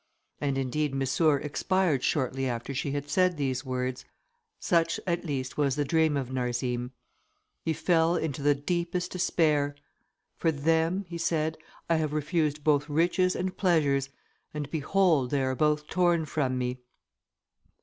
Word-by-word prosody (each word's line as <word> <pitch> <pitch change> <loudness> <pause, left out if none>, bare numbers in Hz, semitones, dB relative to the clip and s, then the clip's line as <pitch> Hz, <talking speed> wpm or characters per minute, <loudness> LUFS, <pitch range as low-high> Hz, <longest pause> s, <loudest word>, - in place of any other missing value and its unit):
And 140 -2 -1
indeed 135 +2 -1
Missour 140 +3 +2
expired 160 -1 0
shortly 135 -1 0
after 120 +2 -3
she 140 +2 -2
had 145 0 -3
said 185 -1 +2
these 130 -2 -1
words. 130 -1 -3 0.6
Such, 165 -1 +1
at 175 -1 -1
least, 130 -4 -3
was 140 -3 +2
the 145 - 0
dream 160 0 +2
of 130 -2 -3
Narzim. 125 -1 -2 0.7
He 160 - 0
fell 165 +1 +2
into 145 -5 -2
the 145 0 +3
deepest 170 +4 -2
despair. 150 -5 +1 0.6
"For 165 - +2
them," 165 +6 +1
he 170 0 -6
said, 160 -1 0 0.3
"I 165 - +3
have 155 -2 -1
refused 150 -1 0
both 145 0 +2
riches 175 +4 +2
and 185 +1 -2
pleasures, 145 -7 +2 0.5
and, 145 -1 -4
behold, 160 -3 +2
they 140 -1 +1
are 130 0 0
both 150 +2 +1
torn 175 -1 +2
from 135 -4 -1
me." 125 0 -2
150 Hz, 150 wpm, -28 LUFS, 135-165 Hz, 0.7 s, the